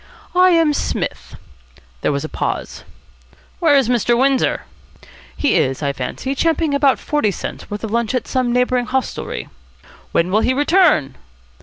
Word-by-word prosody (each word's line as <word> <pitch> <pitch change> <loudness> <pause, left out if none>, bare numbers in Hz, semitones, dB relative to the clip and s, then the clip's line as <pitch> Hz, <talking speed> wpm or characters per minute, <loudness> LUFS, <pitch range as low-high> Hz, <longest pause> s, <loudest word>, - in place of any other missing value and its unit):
"I 365 +1 +5
am 330 -4 +3
Psmith." - - -3 0.7
There - - +1
was 140 -1 -2
a - - -3
pause. - - -4 0.8
"Where 315 -5 +4
is 270 -4 +2
Mr. 240 -1 +2
Windsor?" 265 0 +1 0.7
"He 290 - +1
is, 135 +3 +1
I 140 -1 0
fancy, 140 - -4
champing 320 +1 0
about 280 -2 +3
forty 295 -8 0
cents' 195 - -6
worth 205 +1 -6
of 220 - -4
lunch 235 +1 0
at 250 - -2
some 255 -2 0
neighbouring 250 0 +1
hostelry." 265 -1 -3 0.6
"When 170 +2 +1
will 215 +3 +3
he 255 - +1
return?" 290 - +3
255 Hz, 155 wpm, -19 LUFS, 215-290 Hz, 0.8 s, I